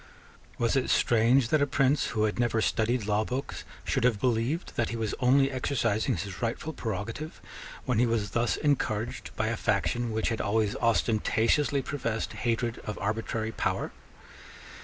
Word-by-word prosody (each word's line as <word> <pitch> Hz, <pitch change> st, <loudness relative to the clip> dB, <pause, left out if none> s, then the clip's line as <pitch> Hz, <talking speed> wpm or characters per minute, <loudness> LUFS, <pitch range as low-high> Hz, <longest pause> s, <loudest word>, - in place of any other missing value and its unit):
Was 115 Hz, +1 st, +1 dB
it 130 Hz, -, +1 dB
strange 120 Hz, +2 st, +4 dB
that 155 Hz, +2 st, +3 dB
a 145 Hz, -, +3 dB
prince 135 Hz, +1 st, +2 dB
who 110 Hz, -2 st, 0 dB
had 110 Hz, +2 st, 0 dB
never 120 Hz, -2 st, +2 dB
studied 110 Hz, +1 st, +1 dB
law 105 Hz, +1 st, +1 dB
books 130 Hz, +5 st, -4 dB, 0.2 s
should 130 Hz, -, 0 dB
have 120 Hz, -4 st, +3 dB
believed 125 Hz, -, 0 dB
that 120 Hz, -, 0 dB
he 115 Hz, -, -3 dB
was 110 Hz, -2 st, -2 dB
only 135 Hz, +2 st, +4 dB
exercising 115 Hz, -6 st, 0 dB
his 95 Hz, 0 st, -6 dB
rightful 120 Hz, +7 st, -2 dB
prerogative, 115 Hz, -, -5 dB, 0.5 s
when -, -, +1 dB
he 120 Hz, -, +4 dB
was 110 Hz, -3 st, -1 dB
thus 120 Hz, 0 st, +1 dB
encouraged 120 Hz, -6 st, -1 dB
by 110 Hz, 0 st, 0 dB
a 115 Hz, -, -1 dB
faction 115 Hz, +3 st, 0 dB
which 110 Hz, 0 st, 0 dB
had 115 Hz, -, -1 dB
always 105 Hz, 0 st, +1 dB
ostentatiously 115 Hz, +5 st, +2 dB
professed 115 Hz, -7 st, -3 dB
hatred 120 Hz, 0 st, -1 dB
of 105 Hz, -, -6 dB
arbitrary 110 Hz, +2 st, -2 dB
power? -, -, -1 dB
115 Hz, 160 wpm, -28 LUFS, 110-130 Hz, 0.5 s, strange